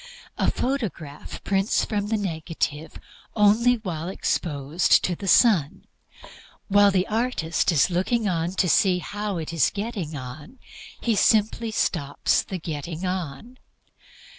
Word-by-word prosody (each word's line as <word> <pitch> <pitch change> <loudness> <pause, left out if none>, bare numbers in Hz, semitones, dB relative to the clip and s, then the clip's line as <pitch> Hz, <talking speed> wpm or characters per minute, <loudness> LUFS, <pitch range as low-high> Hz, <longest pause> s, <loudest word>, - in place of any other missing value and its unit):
A - - +1
photograph 200 - -4
prints 195 +2 +1
from 205 -2 -2
the 220 +1 0
negative 160 -4 -4 0.4
only 225 +4 +4
while 175 -8 -5
exposed 155 -3 +1
to 180 - 0
the 195 - -7
sun. 185 - +3 0.8
While 205 0 +6
the 190 -1 +1
artist 220 -7 0
is 165 +3 +3
looking 190 +7 0
to 180 0 0
see 180 +2 +3
how 205 +2 -4
it 165 0 -5
is 165 - +3
getting 200 -7 -5
on 140 - -9 0.4
he 230 -2 0
simply 220 +2 +2
stops 155 -9 0
the 190 - -6
getting 160 +1 -5
on. 180 - -5
185 Hz, 125 wpm, -24 LUFS, 160-210 Hz, 0.8 s, While